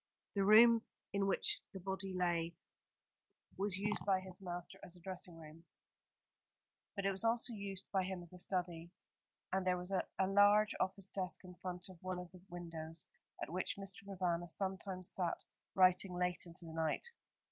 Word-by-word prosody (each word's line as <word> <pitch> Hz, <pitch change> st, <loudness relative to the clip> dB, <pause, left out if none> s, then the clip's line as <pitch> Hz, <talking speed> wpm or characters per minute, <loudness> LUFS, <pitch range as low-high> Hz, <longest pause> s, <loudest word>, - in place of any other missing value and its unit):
The 200 Hz, -, +2 dB
room 225 Hz, +3 st, +8 dB, 0.3 s
in 200 Hz, 0 st, +2 dB
which 415 Hz, -, +1 dB
the 190 Hz, -, -5 dB
body 190 Hz, +1 st, -3 dB
lay 175 Hz, -2 st, 0 dB, 1.0 s
was 195 Hz, 0 st, -1 dB
used 210 Hz, +2 st, -1 dB
by 195 Hz, -2 st, +3 dB
his 185 Hz, 0 st, -11 dB
master 175 Hz, -2 st, -6 dB
as 180 Hz, -, -6 dB
a -, -, -13 dB
dressing 180 Hz, -1 st, -7 dB
room; 160 Hz, +1 st, -12 dB, 1.3 s
but 200 Hz, -, -2 dB
it 195 Hz, -, +4 dB
was 195 Hz, +2 st, 0 dB
also 230 Hz, +1 st, +2 dB
used 200 Hz, -2 st, -4 dB
by 190 Hz, -2 st, +2 dB
him 185 Hz, -1 st, -4 dB
as 175 Hz, -, -5 dB
a 180 Hz, -, -7 dB
study, 175 Hz, -2 st, -1 dB, 0.6 s
and 190 Hz, 0 st, +2 dB
there 185 Hz, -1 st, +2 dB
was 180 Hz, +2 st, -5 dB
a 190 Hz, -, +2 dB, 0.2 s
large 205 Hz, +2 st, +6 dB
office 190 Hz, +1 st, -1 dB
desk 185 Hz, -3 st, -3 dB
in 180 Hz, -1 st, -10 dB
front 180 Hz, 0 st, -4 dB
of 185 Hz, -3 st, -13 dB
one 185 Hz, 0 st, -2 dB
of 180 Hz, -1 st, -7 dB
the 180 Hz, -1 st, -13 dB
windows, 165 Hz, -2 st, -5 dB, 0.4 s
at -, -, -5 dB
which 185 Hz, +2 st, -1 dB
Mr. 195 Hz, 0 st, -4 dB
Provana 175 Hz, -3 st, 0 dB
sometimes 190 Hz, 0 st, -2 dB
sat 175 Hz, -3 st, -1 dB, 0.3 s
writing 185 Hz, 0 st, +6 dB
late 180 Hz, 0 st, +1 dB
into 170 Hz, 0 st, -4 dB
the 160 Hz, -, -8 dB
night. 160 Hz, -, 0 dB
185 Hz, 175 wpm, -38 LUFS, 175-195 Hz, 1.3 s, room